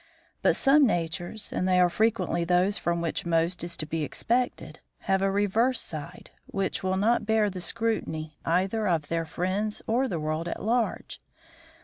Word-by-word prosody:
But - - +3
some 280 0 +5
natures, 175 +3 -3
and 185 - 0
they 185 -1 +4
are 180 - +6
frequently 180 -4 +1
those 180 +4 +2
from 170 0 -1
which 165 -2 -2
most 170 +1 0
is 170 0 -2
to 155 - -4
be 160 +1 -3
expected, 245 - -1 0.2
have 190 -1 +1
a 195 - +2
reverse 210 +6 +1
side, 160 +3 -7 0.2
which 195 -1 -2
will 185 0 0
not 215 +2 +2
bear 220 -2 +2
the 185 -1 -6
scrutiny 165 -6 -2
either 190 +6 +1
of 160 -5 0
their 165 0 -1
friends 190 +6 -2
or 250 +4 +1
the 175 -9 -3
world 155 +2 -2
at - - -5
large. 230 +2 -1
185 Hz, 170 wpm, -27 LUFS, 170-220 Hz, 0.2 s, are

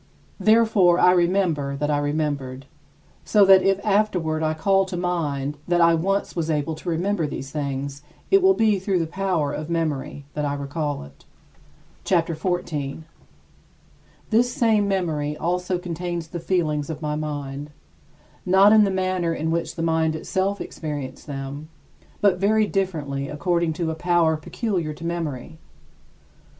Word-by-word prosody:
Therefore, 215 -6 +4
I 180 - +6
remember 170 -6 +1
that 150 +2 -1
I 145 - +2
remembered, 145 -3 -2 0.6
so 205 -2 +4
that 190 -1 +7
if 195 +1 +2
afterward 185 -7 +1
I 155 0 0
call 195 +4 +3
to 185 -1 -5
mind 150 -5 -2
that 175 0 +2
I 170 0 +5
once 195 +5 0
was 165 -2 -2
able 155 +1 0
to 155 +3 -6
remember 175 0 0
these 135 -1 -6
things 140 -1 -4 0.3
it 390 0 +6
will 380 +1 +5
be 215 -3 +2
through 190 0 0
the 165 - 0
power 175 -4 -1
of 155 +1 -5
memory 150 -4 -2
that 150 - -2
I 145 -1 -1
recall 145 - -3
it. 70 0 -16 0.8
CHAPTER 170 -2 +1
XIV 175 +3 -1
21. 145 0 -5 1.3
This 240 +3 +3
same 220 -4 +2
memory 155 -6 -1
also 180 +2 -1
contains 175 -1 -4
the 175 - -5
feelings 160 -4 -1
of 155 0 -6
my 150 0 -1
mind; 145 -1 -5 0.7
not 195 +3 +6
in 215 -1 +7
the - - +1
manner 185 -3 0
in 160 +1 -2
which 170 0 -2
the 165 - -3
mind 160 -1 +1
itself 190 +5 -1
experienced 145 -5 -6
them, 140 +2 -6 0.5
but 195 -3 +3
very 215 +2 +3
differently 150 -9 -2
according 170 +2 0
to 165 0 -2
a - - -2
power 170 -1 +2
peculiar 170 - -3
to 165 - -9
memory. 160 -3 -4
165 Hz, 155 wpm, -23 LUFS, 150-185 Hz, 1.3 s, that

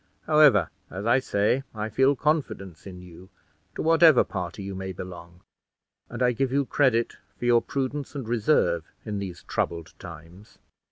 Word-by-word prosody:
However, 150 - +5 0.2
as 95 +4 -6
I 120 +3 +4
say, 110 +1 +1
I 105 0 -3
feel 135 +6 +3
confidence 125 - -2
in 90 -1 -10
you, 90 +1 -14 0.5
to - - -3
whatever 160 -3 +6
party 90 +1 -6
you 100 0 -5
may 95 0 -5
belong, 85 -1 -10 0.7
and 120 +1 -3
I 125 - +4
give 130 +2 -1
you 140 +1 +1
credit 125 -4 +1 0.2
for - - -5
your 120 -1 +4
prudence 140 +3 -4
and 135 -5 -5
reserve 110 - +2 0.2
in 105 -2 -3
these 90 -3 -7
troubled 85 -1 -3
times. 85 +5 -12
110 Hz, 160 wpm, -26 LUFS, 90-135 Hz, 0.7 s, whatever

